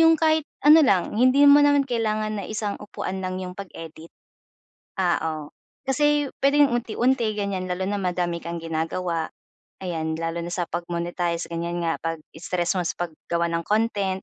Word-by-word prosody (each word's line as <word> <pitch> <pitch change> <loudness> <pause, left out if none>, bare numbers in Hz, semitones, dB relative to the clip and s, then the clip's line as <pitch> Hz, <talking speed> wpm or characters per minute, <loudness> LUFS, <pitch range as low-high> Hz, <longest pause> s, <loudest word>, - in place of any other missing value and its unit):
yung 325 0 +6
kahit 315 -1 +3 0.2
ano 305 +2 +9
lang, 190 -5 +2
hindi 255 +3 +4
mo 290 +1 +8
naman 285 -1 +4
kailangan 215 -2 -1
na 195 - -6
isang 215 -1 -3
upuan 190 -2 -5
lang 185 0 -3
'yong 180 0 -7
pag-edit. 165 -4 -9 0.9
Ah, 175 -2 +3 0.2
oh. 150 -1 -7 0.4
Kasi 295 +1 +2
puwedeng 285 +1 +5
unti-unti, 235 -1 +1
ganyan. 200 -2 -2
Lalo 185 +1 -2
na 205 - -1
madami 175 -2 -1
kang 170 0 -5
ginagawa, 165 +1 -2 0.6
ayan. 160 -2 -2
Lalo 165 +1 -3
na 170 - -5
sa 175 -1 -1
pag-monetize, 170 0 -2
ganyan 170 +1 -3
nga 165 - -1
'pag 165 0 -2 0.2
stress 175 +2 -1
mo 180 - +1
sa - - -2
paggawa 170 +2 -3
ng 165 0 -1
content. 205 -3 0
185 Hz, 165 wpm, -24 LUFS, 170-230 Hz, 0.9 s, ano